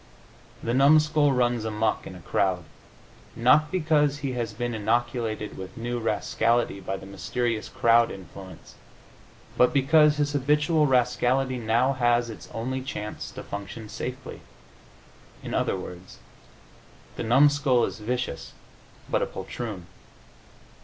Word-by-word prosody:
The 115 - -1
numskull 150 +2 +4
runs 120 -3 +1
amuck 110 0 -1
in 95 - -9
a 90 - -11
crowd, 90 0 0 0.7
not 145 +6 +4
because 150 -5 +2
he 140 -2 -3
has 120 -4 -3
been 120 +3 -3
inoculated 110 0 -1
with 95 0 -9
new 120 +1 -3
rascality 115 0 0
by 95 +1 -4
the 95 - -11
mysterious 110 +3 -3
crowd 115 0 +4
influence, 95 0 -11 0.8
but 125 0 +5
because 150 +2 +4
his 145 -1 0
habitual 150 +2 +2
rascality 125 0 +1
now 120 +4 +2
has 120 -2 +1
its - - -11
only 130 +3 -3
chance 105 -5 -6
to - - -9
function 100 +2 -7
safely. - - -6 1.0
In - - -6
other - - 0
words, 90 0 -10 1.0
the - - -5
numskull 135 +1 +4
is - - -6
vicious, 125 +4 -4 0.5
but - - 0
a - - 0
poltroon. 105 -7 -6
120 Hz, 125 wpm, -26 LUFS, 110-135 Hz, 1.0 s, but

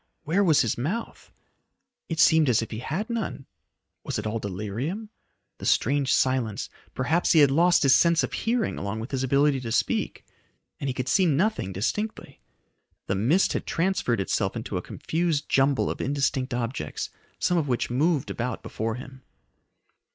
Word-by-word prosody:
Where 170 +6 +2
was 160 -6 +5
his 120 -2 -1
mouth? 185 - -4 0.8
It 165 -1 -3
seemed 160 -5 +5
as 115 -2 +3
if - - -8
he 110 - -4
had 160 - -3
none. 225 - -4 0.6
Was - - -3
it - - -4
all 110 +1 -2
delirium? 110 - -4 0.5
The - - -4
strange 140 +2 +2
silence 130 -5 +1 0.2
perhaps 160 +7 +2
he 160 - +6
had 140 -2 +5
lost 170 +4 +4
his 135 -2 +6
sense 170 +1 +4
of - - -3
hearing 230 0 -1
along 100 +3 -3
with 115 +4 -6
his 135 -1 -1
ability 140 +1 +3
to 120 -3 -5
speak 115 - -1 0.5
and 140 - -3
he 130 - -1
could 130 0 -3
see 185 +7 +3
nothing 165 - +1
distinctly. 210 - -3 0.7
The - - -1
mist 125 - +2
had - - -3
transferred 165 - 0
itself 95 - -1
into - - -5
a - - -1
confused 160 -3 -2
jumble 135 0 +2
of - - -3
indistinct 135 -1 0
objects, 120 - -3 0.3
some 175 -1 +1
of 150 - -2
which 125 -2 -1
moved 150 +3 +1
about 120 0 -3
before 110 0 -3
him. 130 +1 -10
135 Hz, 170 wpm, -26 LUFS, 120-170 Hz, 0.8 s, he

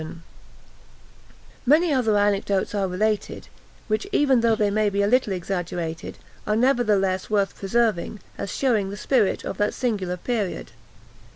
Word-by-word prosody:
Many 305 +4 +4
other 225 -6 +2
anecdotes 200 -1 +1
are 200 -2 0
related, 210 +3 -2 0.4
which 215 - -1
even 270 - +3
though 230 -1 +3
they 210 -1 +1
may 215 0 +2
be 200 0 0
a - - +2
little 250 -1 +2
exaggerated, 175 -3 -4 0.3
are 210 - +2
nevertheless 210 -7 +2
worth 200 -2 +1
preserving, 210 -1 0 0.2
as - - -5
shewing 220 -8 +1
the 200 - -6
spirit 225 -2 +1
of - - -4
that 205 0 +1
singular 195 -8 -2
period. 210 -1 -3
210 Hz, 135 wpm, -24 LUFS, 195-235 Hz, 0.4 s, Many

